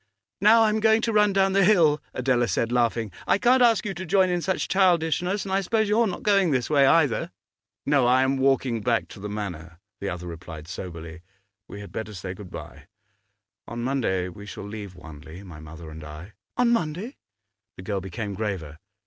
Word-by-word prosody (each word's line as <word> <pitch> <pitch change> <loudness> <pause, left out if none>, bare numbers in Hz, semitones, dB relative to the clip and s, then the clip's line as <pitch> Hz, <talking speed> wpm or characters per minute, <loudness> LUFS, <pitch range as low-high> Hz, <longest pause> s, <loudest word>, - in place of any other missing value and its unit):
'Now 225 +3 +6
I 220 - +4
am 215 +1 0
going 220 +1 +3
to 230 - 0
run 210 -1 +4
down 195 0 +2
the 195 0 +4
hill,' 165 -7 +4
Adela 125 -2 +1
said, 115 +4 -1
laughing. 115 -3 0 0.2
'I - - +4
can't 250 +4 +4
ask 230 -3 +4
you 200 - -2
to 185 +1 -6
join 185 +1 +2
in 175 -1 0
such 190 +2 -1
childishness, 180 +1 +1
and 190 - -5
I 195 +1 +2
suppose 220 +3 0
you 215 +3 +3
are 230 - +3
not 185 - -5
going 200 -4 +3
this 130 -1 -1
way, 140 -2 +5
either?' 145 -4 +3 0.6
'No, 140 -4 +3
I 130 +1 +4
am 135 +1 +1
walking 130 -3 +1
back 115 +1 0
to - - -11
the 105 +1 -6
Manor,' 85 -6 -6 0.2
the 100 - -3
other 90 -1 -6
replied 80 -2 -9
soberly. 85 -2 -8 0.5
'We 100 - -9
had 100 - -10
better 110 -1 -6
say 90 0 -6
good 95 -1 -11
bye. - - -10 0.8
On 120 0 -5
Monday 115 -9 0
we 100 +3 -10
shall 100 +1 -8
leave 105 -3 -8
Wanley, 80 +2 -11
my 85 -6 -11
mother 80 +1 -10
and 80 0 -10
I.' 75 +7 -10 0.2
'On 245 -1 +3
Monday?' 200 - -2 0.6
The 95 - -9
girl 100 0 -2
became 100 +3 -5
graver. 95 -7 -4
120 Hz, 205 wpm, -25 LUFS, -, 0.8 s, Now